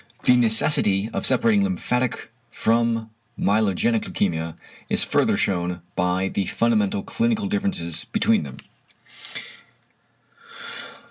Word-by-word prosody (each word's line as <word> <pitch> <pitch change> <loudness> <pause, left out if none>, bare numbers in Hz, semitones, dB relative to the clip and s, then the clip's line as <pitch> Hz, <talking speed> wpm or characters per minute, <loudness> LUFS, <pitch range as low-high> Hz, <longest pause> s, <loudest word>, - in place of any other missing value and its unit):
The 125 - +5
necessity 110 -3 +2
of - - +1
separating 225 -3 +3
lymphatic 130 - -1 0.2
from 115 -1 0 0.3
myelogenic 110 +2 +2
leukæmia 80 -4 -2 0.3
is - - +3
further - - +2
shewn 90 -2 -1
by 90 +1 +1
the 95 0 -2
fundamental 105 -4 +1
clinical 230 -3 0
differences 200 - -2
between - - +2
them. 70 -4 -8
110 Hz, 95 wpm, -23 LUFS, 95-125 Hz, 0.3 s, The